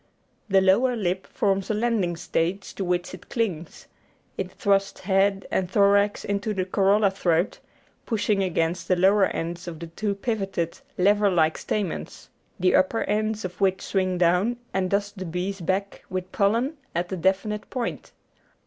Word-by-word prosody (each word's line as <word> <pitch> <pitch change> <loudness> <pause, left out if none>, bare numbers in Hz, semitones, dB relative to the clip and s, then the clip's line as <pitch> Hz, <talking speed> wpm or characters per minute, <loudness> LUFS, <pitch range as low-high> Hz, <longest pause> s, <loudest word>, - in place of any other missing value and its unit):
The 195 -1 +5
lower 230 +7 +4
lip 190 -3 -2
forms 195 -2 0
a 215 - +1
landing 210 -6 0
stage 180 +3 -2
to 195 - -4
which 180 0 -1
it 185 - -11
clings; 180 -9 -3 0.5
it - - -4
thrusts 195 -1 0
head 195 0 +2
and 180 -2 0
thorax 200 +1 +3
into 205 +1 -1
the 185 -1 0
corolla 200 +2 +3
throat, 175 -2 0 0.5
pushing 210 -3 +1
against 170 -1 -1
the 185 - +3
lower 195 +2 +4
ends 170 +1 -4
of 165 -2 -5
the 170 - -6
two 200 +5 -3
pivoted, 195 -4 -2 0.2
lever 205 +2 +4
like 160 -4 +2
stamens, 200 -6 -4 0.3
the 185 0 +3
upper 225 +5 +2
ends 215 0 -1
of 180 +1 -7
which 190 -1 +2
swing 185 -2 0
down 180 +7 +2 0.2
and 190 -1 0
dust 200 0 -1
the 185 - -4
bee's 180 +3 -3
back 190 +3 -2
with 185 -1 -4
pollen 230 +9 +1 0.2
at 175 +2 -1
a - - -1
definite 195 +4 0
point. 250 -3 -4
195 Hz, 160 wpm, -25 LUFS, 180-205 Hz, 0.5 s, The